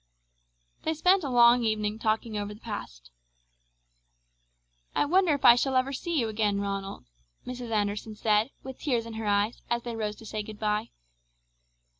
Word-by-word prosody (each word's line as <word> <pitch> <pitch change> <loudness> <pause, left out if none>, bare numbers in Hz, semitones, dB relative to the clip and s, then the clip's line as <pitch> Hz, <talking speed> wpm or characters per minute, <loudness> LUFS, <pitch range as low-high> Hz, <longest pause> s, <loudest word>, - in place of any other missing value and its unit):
They 320 - -1
spent 360 +4 +3
a 280 - -2
long 240 0 +6
evening 215 -1 -1
talking 220 0 -1
over 205 0 -4
the - - -16
past. - - -8 1.8
"I - - +3
wonder 350 0 +3
if 285 - -4
I 235 - +11
shall 260 +2 0
ever 255 +2 +1
see 335 +3 -2
you 230 - +1
again, 210 -2 0
Ronald!" 195 -1 -4 0.4
Mrs. 250 -1 -6
Anderson 210 0 -1
said, 210 +2 +2
with 265 -1 -8
tears 245 -6 0
in 230 - -8
her 220 -1 -4
eyes, 205 +2 +1
as 235 0 0
they 235 -1 -5
rose 210 -2 -3
to 225 - -14
say 215 0 -4
goodbye. 210 0 -2
225 Hz, 165 wpm, -28 LUFS, 210-250 Hz, 1.8 s, I